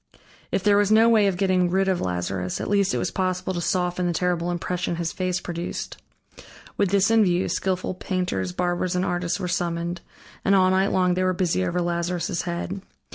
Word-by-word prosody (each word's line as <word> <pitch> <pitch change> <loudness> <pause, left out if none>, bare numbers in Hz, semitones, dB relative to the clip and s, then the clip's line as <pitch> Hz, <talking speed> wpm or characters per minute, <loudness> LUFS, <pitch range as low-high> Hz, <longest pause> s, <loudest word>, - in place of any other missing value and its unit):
If 185 - 0
there 205 -1 +4
was 205 0 +2
no 220 +1 +6
way 215 -3 +5
of 190 -2 0
getting 185 -2 +2
rid 190 +2 +1
of 190 -2 +1
Lazarus, 90 0 -2
at - - -3
least 200 -1 +3
it - - 0
was - - -1
possible 185 0 -1
to 175 - -3
soften 180 0 0
the 175 - 0
terrible 175 0 0
impression 175 0 -2
his 170 -1 -2
face 185 -1 -1
produced. 175 -1 -5 0.8
With 200 - +1
this 200 +2 +3
in 225 -1 +5
view, 180 -1 +1
skillful 185 -1 -1
painters, 180 - -2
barbers, 175 - -1
and 180 +1 +1
artists 175 +1 -1
were 185 - -3
summoned, 170 0 -2 0.4
and 200 - +4
all 185 -1 +4
night 190 +1 +2
long 180 -1 +2
they 185 - -1
were 185 0 +2
busy 175 - 0
over 175 - -1
Lazarus' 175 +1 -1
head. 180 +2 -4
180 Hz, 200 wpm, -24 LUFS, 175-190 Hz, 0.8 s, no